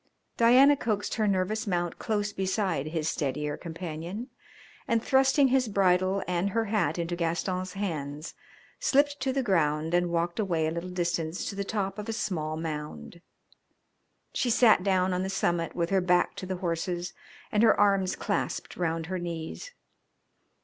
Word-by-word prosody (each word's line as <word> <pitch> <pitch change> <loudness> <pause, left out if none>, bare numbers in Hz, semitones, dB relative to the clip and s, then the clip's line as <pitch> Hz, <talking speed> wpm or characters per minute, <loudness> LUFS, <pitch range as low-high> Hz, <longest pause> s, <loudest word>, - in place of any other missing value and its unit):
Diana 255 +5 +6
coaxed 215 -6 -2
her 215 -1 +1
nervous 200 +3 0
mount 175 -2 -1
close 210 -2 -1
beside 190 -6 -1
his 155 -1 -2
steadier 150 0 -2
companion, 170 - -6 0.6
and, 230 -1 +1
thrusting 270 +1 +4
his 255 -1 +2
bridle 190 -1 +2
and 180 +2 0
her 225 +3 0
hat 195 -7 0
into 170 0 -2
Gaston's 180 +2 -2
hands, 155 -6 -4 0.5
slipped 285 +1 +2
to 265 - 0
the 270 0 0
ground 160 -5 +1
and 175 0 +2
walked 170 +3 -1
away 170 -6 +1
a 155 - 0
little 170 +2 -4
distance 170 -1 -2
to - - -9
the 200 - -2
top 195 -1 -3
of 210 +2 -6
a - - -1
small 155 -8 -2
mound. 160 +1 -6 1.1
She 250 - 0
sat 230 -4 +5
down 185 -1 +2
on 180 - 0
the 190 - -2
summit 175 -3 -1
with 170 0 -1
her 195 -1 +3
back 180 0 +2
to 185 - -6
the 185 - -2
horses 175 0 -3 0.4
and 210 - +2
her 230 - +5
arms 195 -2 +3
clasped - - -3
round 165 -2 -1
her 185 +2 -3
knees. 170 - -5
185 Hz, 165 wpm, -28 LUFS, 170-205 Hz, 1.1 s, Diana